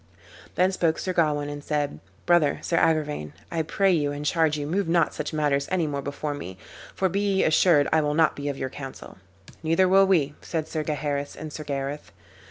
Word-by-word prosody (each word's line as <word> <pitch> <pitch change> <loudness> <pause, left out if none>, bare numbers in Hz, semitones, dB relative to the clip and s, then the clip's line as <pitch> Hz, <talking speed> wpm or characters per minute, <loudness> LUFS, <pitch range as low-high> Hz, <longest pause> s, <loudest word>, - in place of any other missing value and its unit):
"Then 185 +1 +3
spoke 165 -4 +1
Sir 185 - -3
Gawain, 150 -4 +1
and 145 0 -6
said, 145 - -2 0.3
"Brother, 170 -5 +3
Sir 170 - -1
Agrivain, 150 - 0 0.2
I 165 - 0
pray 195 +5 +1
you 150 -5 +1
and 145 +1 -5
charge 160 -1 +2
you 145 - -3
move 180 +5 -1
not 170 -2 +2
such 150 - -4
matters 145 -2 0
any 180 -3 +1
more 140 -2 -3
before 145 +2 -4
me, 95 -10 -7 0.4
for 190 - +1
be 195 +2 -1
ye 200 -2 +1
assured 155 -2 +4
I 160 - +4
will 150 0 0
not 160 0 +3
be 145 0 -4
of 140 - -4
your 130 -1 -4
counsel." 135 -8 -9 0.4
"Neither 165 +4 +3
will 195 +1 +5
we," 155 -7 +2
said 160 -2 -3
Sir 155 - -3
Gaheris 145 -2 -3
and 155 -1 -8
Sir 155 - -6
Gareth. 140 0 -4
150 Hz, 205 wpm, -25 LUFS, 145-170 Hz, 0.4 s, will